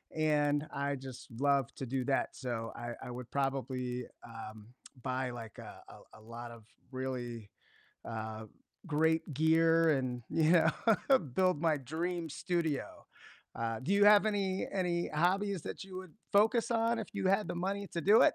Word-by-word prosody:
and 150 -1 +2
I 140 0 -1
just 130 0 -9
love 140 -3 +2
to 135 - -5
do 130 +1 -1
that, 140 - 0
so 115 -3 -4
I 120 0 -5
I - - -7
would 125 0 -8
probably, 130 -3 -2 0.2
um, 110 -2 -9 0.3
buy, 130 +1 -1
like, 115 -3 -8
a - - -8 0.2
a - - -15
a - - -17
lot 120 +1 -8
of 115 -2 -13 0.3
really, 120 -4 -4 0.6
uh, 110 -1 -5 0.4
great 160 0 +1
gear 165 +2 +4
and, 130 -4 0
you 160 +1 +3
know, 210 - +4
build 175 +3 +1
my 160 -3 +3
dream 165 +5 -3
studio. 160 -1 -2 0.5
Uh, 115 -1 -2
do 170 +9 -1
you 200 0 +5
have 210 0 +8
any 195 -3 0
any 175 -3 0
hobbies 185 +3 +1
that - - -6
you 190 -1 -9
would 185 -3 -8 0.2
focus 225 +4 +4
on 230 0 +2
if 220 - -4
you 195 -2 -1
had 195 +2 +2
the - - -2
money 200 +3 -2
to 170 - -3
do 205 +6 +6
it? - - +5
150 Hz, 165 wpm, -33 LUFS, 125-185 Hz, 0.6 s, have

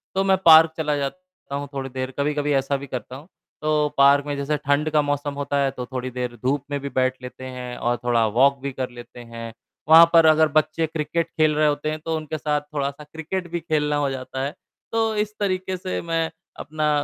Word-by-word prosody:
तो 195 - +2
मैं 190 -1 +3
पार्क 160 0 +8
चला 150 -2 0
जाता 185 +1 -6
हूँ 140 0 -4
थोड़ी 135 -1 -4
देर 130 0 -4
कभी-कभी 145 0 0
ऐसा 135 +1 +1
भी 140 +1 -9
करता 125 0 -6
हूँ। 145 +5 -12 0.3
तो 150 -1 +2
पार्क 140 +1 +5
में 145 -1 -3
जैसे 145 +2 -1
ठंड 145 +3 0
का 150 -1 +4
मौसम 145 0 -2
होता 140 0 -2
है 135 - +1
तो 125 - -6
थोड़ी 130 0 -5
देर 125 -1 -4
धूप 140 +2 0
में 140 - -1
भी 140 - -5
बैठ 130 -1 +1
लेते 125 +1 -9
हैं 125 -1 -7
और 120 0 0
थोड़ा 120 -2 +2
वॉक 135 +6 +3
भी 140 0 -3
कर 130 -1 -3
लेते 120 0 -12
हैं। 115 -1 -8 0.4
वहाँ 165 +1 +10
पर 165 -1 +7
अगर 155 0 +5
बच्चे 155 +1 +1
क्रिकेट 160 +2 -2
खेल 155 -1 +2
रहे 155 0 +3
होते 145 +1 -1
हैं 155 - -4
तो 165 -1 -1
उनके 155 0 -5
साथ 150 -1 -1
थोड़ा-सा 140 +1 -3
क्रिकेट 160 +4 -5
भी 170 - -1
खेलना 150 -2 0
हो 145 -1 0
जाता 130 0 -5
है। 145 - -4 0.4
तो 225 -1 +1
इस 210 0 -1
तरीके 185 -2 -1
से 185 +1 -4
मैं 165 -1 -1 0.3
अपना 155 0 -2
145 Hz, 220 wpm, -23 LUFS, 135-160 Hz, 0.4 s, वहाँ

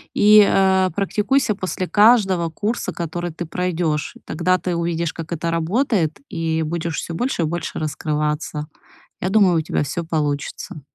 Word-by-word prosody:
и, 210 0 +7
э, 190 -1 +3
практикуйся 215 +5 +1
после 185 -2 -4
каждого 205 -6 +4
курса, 210 +8 -2
который 175 +1 -4
ты 170 +2 -6
пройдёшь. 170 -3 -2
Тогда 180 +3 +1
ты 180 0 -3
увидишь, 170 -1 -1
как 165 0 -8
это 170 0 -2
работает, 170 - 0
и 160 -1 -1
будешь 165 +1 -3
всё 170 - -4
больше 210 0 -1
и - - +1
больше 165 +1 -4
раскрываться. 150 0 -2 0.6
Я 185 - 0
думаю, 190 -4 +4
у - - +2
тебя - - -1
всё 170 +4 -3
получится. 150 -1 -3
170 Hz, 155 wpm, -21 LUFS, 160-190 Hz, 0.6 s, и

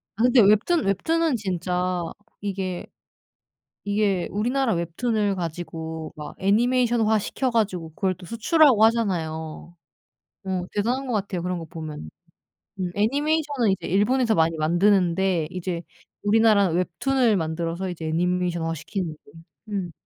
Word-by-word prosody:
아 225 - 0
근데 245 -1 +6
웹툰 215 - +3
웹툰은 320 - +1
진짜 180 -2 -1 0.4
이게, 190 -3 -3 1.0
이게 200 -3 0
우리나라 240 +3 0
웹툰을 200 +5 0
가지고 160 -2 -5
막 150 -1 -8
애니메이션화 225 +1 +2
시켜 255 +5 -2
가지고 195 -8 -1
그걸 185 +4 -1
또 180 0 -13
수출하고 235 - +4
하잖아요. 170 -7 -1 0.7
어 185 -2 -1
대단한 245 +6 -1
것 250 - -3
같아요 195 -4 -2
그런 180 0 -2
거 165 - -6
보면은. 155 - -7 0.7
음 180 - -1
애니메이션은 285 +2 +1
이제 190 - -2
일본에서 225 +5 +2
많이 165 -2 +2
만드는데 175 0 +2
이제 180 -1 -4 0.4
우리나라는 205 -4 +4
웹툰을 215 +6 +1
만들어서 165 +2 -2
이제 165 -2 -6
애니메이션화 175 0 0
시키는 175 +1 -4
게 - - -19 0.4
음. 180 -4 -3
190 Hz, 320 characters per minute, -24 LUFS, 170-225 Hz, 1.0 s, 근데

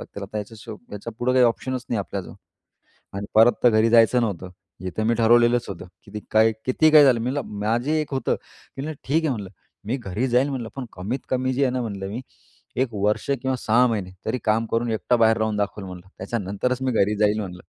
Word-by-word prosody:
लागतील, 100 - -9
आता 100 +2 -5
याच्यापुढं 110 +2 -5
काही 130 -1 +5
ऑप्शनच 125 +2 -2
नाही 115 - -1
आपल्याजवळ. 100 -1 -5 0.8
आणि 100 +1 -4
परत 115 +2 +7
तर 120 - +8
घरी 110 +1 +3
जायचं 115 +2 +5
नव्हतं. 95 -5 -3 0.4
इथं 100 +4 -3
मी 115 - +3
ठरवलेलंच 120 +1 +4
होतं, 95 -2 -7 0.2
की 105 +1 -8
काय, 110 +1 +5
किती 155 +5 +4
काय 150 -1 +8
झालं, 125 -4 +4
मी 120 +3 -1
म्हणलं, 140 -5 -4
माझी 115 +7 0
एक 150 -2 -5
होतं, 130 - 0 0.4
मी 135 - -4
म्हणलं, 155 +1 -5
"ठीक 155 +5 +1
आहे," 155 - +1
म्हणलं, 105 -7 -4 0.4
"मी 120 +5 0
घरी 120 +1 -3
जाईल," 125 +3 +3
म्हणलं, 125 -4 -4
"पण 135 - -4
कमीत 100 +9 -3
कमी 130 0 0
जी 140 - 0
आहे 130 - +1
ना," 130 - -1
म्हणलं, 100 -4 -5
"मी 110 +5 -5 0.6
1 135 - 0
वर्ष 105 +5 0
किंवा 130 -1 0
6 120 +2 +3
महिने 100 -5 -2 0.2
तरी 130 - -1
काम 110 +1 +2
करून, 115 +1 0
एकटा 115 +3 +1
बाहेर 110 -1 +4
राहून 110 -1 0
दाखवल 105 0 -2
म्हणलं, 90 -1 -10
त्याच्यानंतरच 105 +5 -2
मी 130 -1 0
घरी 105 -1 +2
जाईल 105 0 +2
म्हणलं." 90 -3 -7
115 Hz, 210 wpm, -23 LUFS, 105-125 Hz, 0.8 s, तर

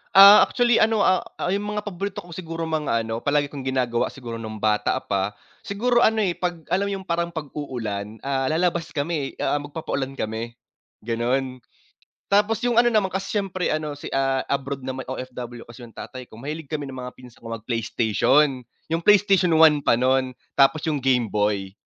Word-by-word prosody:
Ah, 200 +2 +11
actually 240 -1 +2
ano, 220 -1 +3
ah 185 0 +4 0.2
ah, 180 - -2
yung 200 +1 -1
mga 210 - -2
paborito 200 0 -5
ko 175 - -14
siguro 165 -1 -5
mga 150 -8 0
ano 115 0 -3
palagi 145 +2 0
kong 140 -3 -7
ginagawa 125 -3 0
siguro 120 -3 -7
nung 110 -1 -6
bata 105 -1 +1
pa, 100 +1 -1 0.3
siguro 240 +4 +1
ano, 220 -2 +3
eh, 190 - +1
pag 175 -3 -3
alam 195 +2 +1
mo 200 - -2
yung 190 - -13
parang 170 0 -1
pag-uulan 120 -9 -5
ah, 135 -1 -1
lalabas 170 +2 0
kami, 145 -1 -2
eh. - - -5
Ah, 145 - +1
magpapa-ulan 145 -2 -4
kami 115 0 -4 0.5
ganun. 125 +3 -1 0.7
Tapos 205 +2 +2
yung 245 -1 +1
ano 240 0 +5
naman 215 -4 +3
kasi 190 +3 -4
siyempre 190 -2 -2
ano 155 -1 -2
si 145 - -8
ah, 135 -1 +1
abroad 140 -1 -3
naman 130 0 -5
OFW 125 -2 -6
kasi 115 +2 -12
yung 115 -1 -13
tatay 130 -2 -8
ko - - -15
mahilig 150 +5 -6
kami 150 -2 -3
ng 135 - -8
mga 125 0 -7
pinsan 125 -2 -15
ko 115 - -9
mag 115 -1 -13
Playstation, 125 +4 +2 0.3
yung 165 - 0
Playstation 195 -3 +4
I 155 -2 +6
pa 115 - +3
nun 130 0 +1 0.2
tapos 145 +3 +3
yung 155 -3 0
Game 125 -3 +2
Boy. 105 -2 0
140 Hz, 190 wpm, -23 LUFS, 125-180 Hz, 0.7 s, Ah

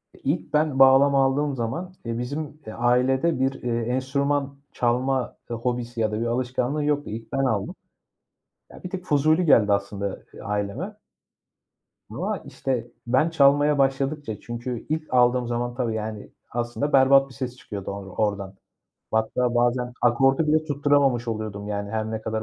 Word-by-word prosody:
E, - - -18
ilk 150 +1 -2
ben 150 -3 +2
bağlama 135 +1 +6
aldığım 140 +1 0
zaman, 165 +11 -4
e, 115 0 -3
bizim, 145 +4 -5
e, 110 - -7
ailede 125 +6 +2
bir, 135 +1 +1
eee, 120 -1 0
enstrüman 140 +3 -1
çalma 125 +2 0
hobisi 120 0 -3
ya 110 - +1
da 105 - -2
bir - - 0
alışkanlığı 125 +4 -1
yoktu. 145 -1 0
İlk 110 +1 -7
ben 135 0 +1
aldım. 105 -6 -1 0.9
Ya - - -14
bir 180 - -5
tık 180 -1 -6
fuzuli 155 +3 +3
geldi 105 -8 +5
aslında 100 -1 -2 0.2
aileme. 105 - -3 1.2
Ama, - - -2
işte, 125 -3 -3 0.2
ben 130 +7 +3
çalmaya 145 -1 +4
başladıkça 135 -3 0
çünkü 120 0 -5
ilk 155 -3 -3
aldığım 125 0 +3
zaman 120 0 -2
tabii 120 -3 -1
yani, 110 -1 -5 0.2
aslında 120 +5 -2
berbat 135 0 +6
bir - - -14
ses 125 0 -5
çıkıyordu 100 -5 -6
or 100 -1 -7 0.2
oradan. 100 -1 -5 0.6
Hatta, 120 +2 0
bazen 120 +1 +1
akordu 135 +5 +3
bile 155 +1 +3
tutturamamış 145 -5 +2
oluyordum 105 -2 -4
yani, 100 -1 -3
her 110 0 -2
ne 110 0 -3
kadar 110 0 -3
125 Hz, 155 wpm, -24 LUFS, 115-140 Hz, 1.2 s, bağlama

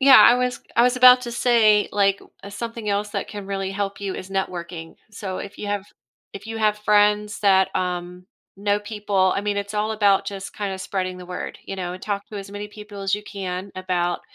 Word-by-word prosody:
Yeah, 270 0 +9
I 240 - +8
was 250 -1 -1 0.2
I 235 - +6
was 250 0 +2
about 250 0 +8
to 240 -1 -5
say, 225 -4 +4
like, 200 -1 +3
w - - -18
uh, 200 - -8
something 230 +1 -5
else 205 +1 0
that - - -3
can 205 -2 -7
really 195 -1 -3
help 200 0 -3
you 195 -2 -3
is 185 +1 -8
networking, 175 -3 -4 0.2
so, 195 -3 -5
if 200 - -8
you 210 - -5
have 205 -1 -2 0.5
if 200 +2 -9
you 225 - -5
have 210 -1 +2
friends 210 0 +3
that, 190 -2 +4
um, 180 0 -3 0.3
know 205 +1 +1
people 205 -3 +1
I - - +1
mean, 205 0 -1
it's 200 +1 -4
all 210 +1 0
about 200 -2 +3
just 195 -1 -6
kinda 200 -2 -3
spreading 185 -1 -3
the 180 0 -10
word, 180 0 -6
you - - -5
know, 180 -1 -4
talk 200 +1 -4
to 210 - -8
as 195 0 -8
many 205 +1 -6
people 210 -1 -10
as 195 0 +1
you 210 - -5
can 190 -1 -5
about 180 -1 -1
200 Hz, 220 wpm, -23 LUFS, 190-210 Hz, 0.5 s, Yeah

